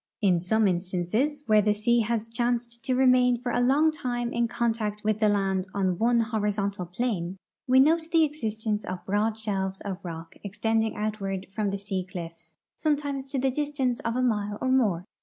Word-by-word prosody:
In 185 -5 +3
some 215 +5 +2
instances, 190 - -1
where 215 -3 +5
the 210 0 +2
sea 235 +3 +2
has 225 0 -1
chanced 235 0 -2
to 255 - +1
remain 250 -2 +4
for 245 0 -3
a 245 - +1
long 285 +6 +4
time 245 -5 -3
in 235 0 +1
contact 225 -3 -1
with 215 0 +1
the 215 -1 +4
land 195 -2 0
on 185 -3 0
one 235 +1 +3
horizontal 205 -4 -1
plane, 185 -2 -2 0.3
we 260 +1 +5
note 320 +4 +4
the 330 -2 +5
existence 220 -8 -2
of 185 0 -6
broad 210 +3 0
shelves 195 -3 -2
of 195 -2 -5
rock 165 -1 -8
extending 220 +2 0
outward 195 -3 -3
from 210 -1 0
the 200 - -2
sea 195 -2 -3
cliffs, 165 -3 -9 0.2
sometimes 285 -3 -1
to 275 - -2
the 265 0 +1
distance 275 -3 -1
of 230 0 -2
a 255 - +1
mile 210 -4 0
or 260 - 0
more. 205 -10 +2
220 Hz, 185 wpm, -27 LUFS, 195-250 Hz, 0.3 s, where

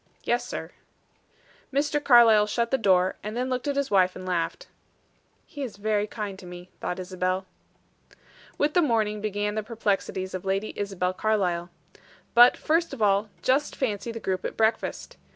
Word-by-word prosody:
"Yes, - - +1
sir." - - -6 1.0
Mr. 290 +1 0
Carlyle 230 -5 +6
shut 235 +2 -1
the 265 - +3
door, 185 -3 +3
and 210 +3 -5
then 255 +1 -1
looked 255 +2 -2
at 285 - 0
his 280 -3 -1
wife 185 -2 +3
and 185 - -8
laughed. 180 - -2 0.8
"He 290 - -9
is 245 -7 -5
very 210 0 0
kind 205 -3 -6
to 180 - -11
me," 180 +1 -10
thought 180 - -3
Isabel. 185 0 -2 1.1
With 295 +1 +1
the 355 - +4
morning 220 -7 +1
began 210 0 -2
the 215 - -1
perplexities 205 -4 -2
of 185 - -4
Lady 195 +2 -1
Isabel 190 -3 -2
Carlyle. 185 -4 0 0.6
But, 240 +1 +7
first 330 -2 0
of 225 - -2
all, 200 +1 +2
just 270 +3 +1
fancy 230 -3 -2
the 230 - -6
group 190 -3 -2
at - - -5
breakfast. 220 0 -1
210 Hz, 170 wpm, -26 LUFS, 190-240 Hz, 1.1 s, But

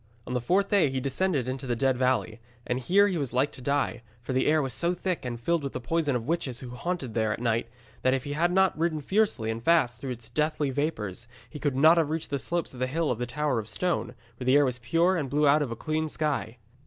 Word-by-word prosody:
On - - -5
the 125 - 0
fourth 195 +10 +2
day 195 -8 +4
he 130 0 -2
descended 140 +1 0
into 130 +1 -4
the 120 - 0
Dead 130 +2 +2
Valley. 120 -3 0 0.3
And 125 +1 -1
here 195 +9 +4
he 185 -4 -1
was 135 -5 -3
like 130 +4 +2
to - - -12
die, 140 -3 0 0.2
for 125 +3 -5
the 130 - +2
air 155 +1 +4
was 135 -4 -2
so 170 +10 0
thick, 180 0 -2
and 120 -1 -4
filled 170 +7 +1
with 140 -1 -5
the - - -3
poison 150 +1 0
of 115 -2 -2
witches 145 -7 -1
who 125 -2 -8
haunted 130 -1 -4
there 110 -1 +1
at - - -3
night, 115 -1 0 0.3
that 130 +1 +3
if 130 - -3
he 145 - -4
had 170 +4 +1
not 190 0 +3
ridden 160 -1 0
fiercely 190 - +1
and 115 +1 -5
fast 145 -6 +3
through 135 - -4
its 120 -3 -6
deathly 150 -2 0
vapours, 120 - -3 0.2
he 150 - -7
could 145 -3 -1
not 160 +5 +6
have 160 -3 +2
reached 160 -1 -3
the 140 - 0
slopes 170 +2 -2
of 125 - -10
the 130 - 0
Hill 160 +4 0
of 120 - -2
the 120 - -2
Tower 150 -1 0
of 110 0 -6
Stone, 175 -7 -1 0.2
where 125 - -6
the 130 +2 +4
air 145 0 +6
was 125 -2 -1
pure 165 +10 +2
and 145 -6 -2
blew 150 +2 +2
out 145 +2 +5
of 145 - -1
the 115 - -4
clean 155 +4 -2
sky. 145 -7 -2
140 Hz, 265 wpm, -27 LUFS, 125-160 Hz, 0.3 s, not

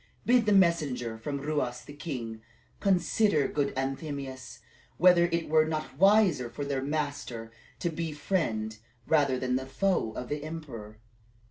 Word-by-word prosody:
Bid 240 -2 +4
the - - +4
messengers 150 - +2
from 140 +4 -3
Ruas 140 -4 -2
the 145 - -10
king 125 -7 -5 0.4
consider, 190 -4 +2
good 145 -1 0
Anthemius, 135 -2 -4 0.4
whether 180 -1 +6
it 170 -1 -1
were 155 0 +4
not 155 -3 -4
wiser 195 - +5
for 130 +5 -5
their 140 -1 -1
master 140 -6 -3 0.3
to 175 - -2
be 165 0 -3
the 150 - -9
friend 110 - -1 0.3
rather 140 -5 +3
than 125 0 0
the 130 0 -5
foe 180 - 0
of 125 +3 -5
the 150 +1 -3
emperor. 135 -10 -7
145 Hz, 150 wpm, -29 LUFS, 125-170 Hz, 0.4 s, whether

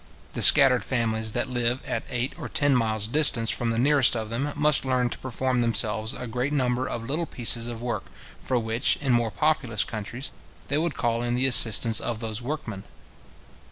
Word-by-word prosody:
The - - -4
scattered 135 -4 +7
families 110 -3 -1
that 120 - -2
live 125 0 -2
at - - -3
eight 125 +1 -4
or - - -7
ten 145 -2 +1
miles 110 -3 0
distance 125 -4 +4
from 120 - -2
the 115 - -2
nearest 135 +1 +3
of 110 -1 -5
them, 135 +6 -3
must 150 0 +2
learn 125 -2 -1
to - - -5
perform 130 0 -3
themselves 110 0 +1
a 125 - -7
great 125 +4 -4
number 130 -3 -1
of 115 - -6
little 160 +5 -3
pieces 115 -1 +2
of 120 -1 -8
work, 120 -1 -4 0.3
for 130 - -2
which, 115 0 0
in 135 -4 -1
more 120 -1 0
populous 125 -2 -1
countries, 120 +5 -7 0.4
they 145 - 0
would 165 -4 -3
call 115 -1 -2
in 120 0 -2
the 130 +2 0
assistance 115 -3 +5
of 115 -2 -5
those 110 0 -3
workmen. 120 -7 -6
120 Hz, 195 wpm, -24 LUFS, 115-135 Hz, 0.4 s, scattered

